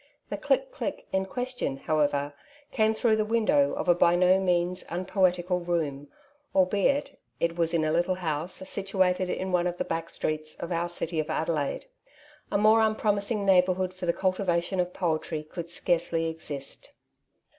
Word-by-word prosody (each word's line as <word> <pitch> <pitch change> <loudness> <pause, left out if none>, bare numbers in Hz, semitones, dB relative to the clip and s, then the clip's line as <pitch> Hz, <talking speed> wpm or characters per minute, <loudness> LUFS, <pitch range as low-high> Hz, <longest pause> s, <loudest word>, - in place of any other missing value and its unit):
The - - -2
"click, - - 0
click'' - - -4
in 190 0 0
question, 245 - -3
however, 145 -1 0 0.4
came 220 -1 +2
through 220 -1 +2
the 215 - +2
window 230 +6 +2
of - - -3
a 175 - +7
by 175 0 +4
no 180 +1 +4
means 180 -1 0
unpoetical 180 0 +1
room, 155 -5 -2 0.5
albeit 205 +10 +2 0.2
it 170 0 0
was 165 -1 +1
in 165 -2 +1
a 155 - +1
little 175 +3 +1
house, 175 +2 -2
situated 190 -2 +1
in 190 +1 -2
one 180 0 +2
of 175 0 -3
the - - -2
back 165 0 -3
streets 155 0 -3
of 170 - -6
our 170 0 0
city 170 -1 -3
of 155 - -2
Adelaide. 155 - -1 0.7
A - - +2
more 215 +2 +5
unpromising 210 -1 +1
neighbourhood 185 -1 +3
for 185 -1 -6
the - - +5
cultivation 185 0 0
of 180 0 0
poetry 160 -3 -2
could 170 +2 -7
scarcely 170 -1 0
exist. 150 -4 -6
180 Hz, 165 wpm, -27 LUFS, 165-195 Hz, 0.7 s, a